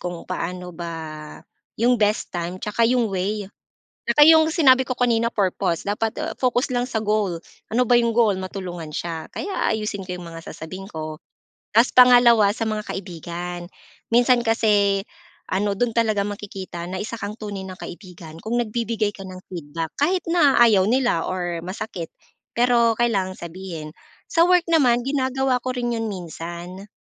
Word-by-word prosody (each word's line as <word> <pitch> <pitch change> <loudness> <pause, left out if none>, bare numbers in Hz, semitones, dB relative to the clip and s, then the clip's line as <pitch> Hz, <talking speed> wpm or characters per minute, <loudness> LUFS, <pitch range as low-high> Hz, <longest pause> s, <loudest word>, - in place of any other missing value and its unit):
kung 175 -1 -6
paano 180 0 -5
ba 170 0 -6 0.9
yung 240 +1 +2
best 210 +1 +1
time 175 +1 -3
'tsaka 215 +4 +1
yung 240 -4 +1
way, 200 +3 -1 0.6
'tsaka 295 0 +5
yung 320 0 +6
sinabi 260 -6 +5
ko 255 -1 -5
kanina 235 -1 +2
purpose 185 -3 -1
dapat, 220 +2 0
ah, 310 +1 -3
focus 250 0 +1
lang 245 - +1
sa 245 -3 -2
goal. 210 -5 0 0.3
Ano 245 +1 +2
ba 245 - +5
yung 235 -1 +3
goal, 220 -4 +3
matulungan 185 -4 -6
siya 165 +1 -5
kaya 395 -10 -2
aayusin 210 -2 -3
ko 185 - -7
yung 175 - -9
mga 165 0 -9
sasabihin 185 +5 -9
ko. 155 -1 -6 0.5
Tas 230 +4 +5
pangalawa 245 -4 +7
sa 225 0 -3
mga 215 -1 -2
kaibigan. 175 -2 -6 0.5
Minsan 240 +1 +4
kasi 205 -3 +2 0.4
ano, 200 +2 0
do'n 230 +3 -1
talaga 220 -3 +2
makikita 195 -4 -7
na 185 +2 -5
isa 220 +3 -4
kang 210 0 -6
tunay 205 -3 -5
ng 185 -1 -9
kaibigan 175 -4 -10
kung 240 +2 -1
nagbibigay 225 -2 -1
ka 195 - -9
ng 185 -1 -9
feedback 165 -2 -5
kahit 355 +6 +2
na 325 -7 +4
ayaw 220 -5 +6
nila 240 -5 +2
or 175 -2 -3
masakit, 185 -2 -6 0.4
pero 235 -1 +3
kailangan 195 -6 0
sabihin. 170 -3 -8 0.3
Sa 335 - +3
work 360 0 +4
naman 270 -8 +4
ginagawa 265 -2 0
ko 255 - -1
rin 240 -1 -2
'yon 225 -1 -2
minsan 175 +2 -8
210 Hz, 160 wpm, -23 LUFS, 180-240 Hz, 0.9 s, pangalawa